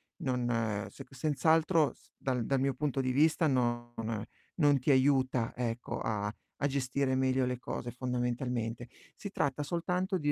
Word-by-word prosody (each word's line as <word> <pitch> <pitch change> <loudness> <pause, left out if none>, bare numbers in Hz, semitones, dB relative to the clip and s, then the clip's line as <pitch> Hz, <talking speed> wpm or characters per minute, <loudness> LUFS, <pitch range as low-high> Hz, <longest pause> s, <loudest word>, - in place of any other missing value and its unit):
non 125 -2 -1
ehm, 110 -4 0
se 135 - -10
senz'altro 155 +3 +3
s - - -26
dal 125 -4 -1
dal 135 -1 +1
mio 135 -1 +1
punto 140 -1 0
di 130 - 0
vista 155 +4 +4
non 120 -3 0 0.6
non 145 -4 +4
ti 135 - +2
aiuta 130 -3 +3
ecco 120 -1 -2
a 105 -2 -1 0.3
a 145 - +1
gestire 135 0 0
meglio 130 0 +2
le 125 -1 -2
cose, 120 -1 -4
fondamentalmente. 125 -1 -2 0.3
Si 200 - -7
tratta 145 -4 0
soltanto 180 +4 -1
di 145 -2 +1
130 Hz, 155 wpm, -32 LUFS, 125-145 Hz, 0.6 s, vista